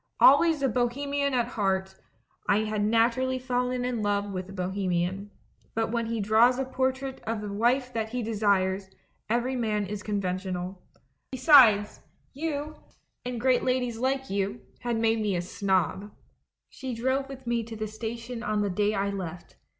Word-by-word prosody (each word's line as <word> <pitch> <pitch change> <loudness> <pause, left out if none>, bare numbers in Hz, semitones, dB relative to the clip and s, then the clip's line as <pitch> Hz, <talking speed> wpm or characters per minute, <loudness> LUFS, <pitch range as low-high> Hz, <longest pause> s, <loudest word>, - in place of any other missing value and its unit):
Always 295 +2 +6
a - - +4
bo 245 0 +2
hemian 280 +2 -1
at 240 -1 +1
heart, 190 -3 -1 0.6
I 210 +2 +4
had 215 -1 -1
naturally 230 +4 +2
fallen 250 0 -1
in 245 -3 -1
love 205 -1 0
with 185 0 -5
a - - -8
bohemian; 190 0 -2 0.5
but 225 0 0
when 235 -1 -1
he 230 0 -2
draws 220 +5 +4
a 265 - -1
portrait 260 +1 -2
of 225 -1 -1
the 210 -1 -5
wife 250 +4 +1
that 220 -1 -2
he 245 +1 -3
desires, 200 -3 +1 0.4
every 240 +3 0
man 215 -4 0
is 205 +1 -5
conven 195 -3 -2
tional. 185 0 -4 0.5
Besides, 245 -7 +6 0.3
you, 300 +1 -3 0.5
and 245 -1 -4
great 255 +1 +3
ladies 250 -3 0
like 265 +1 0
you, 195 -10 -1 0.2
had 240 -1 -1
made 225 0 +2
me 205 -3 0
a 175 - 0
snob. 190 +2 -1 0.6
She 260 -3 -6
drove 260 +3 0
with 265 -1 -9
me 235 -1 0
to 225 0 -8
the 215 0 -3
station 230 +2 -6
on 210 -2 0
the 200 - -1
day 210 +3 +1
I 200 0 0
left. 180 -3 -7
225 Hz, 170 wpm, -27 LUFS, 200-255 Hz, 0.6 s, Always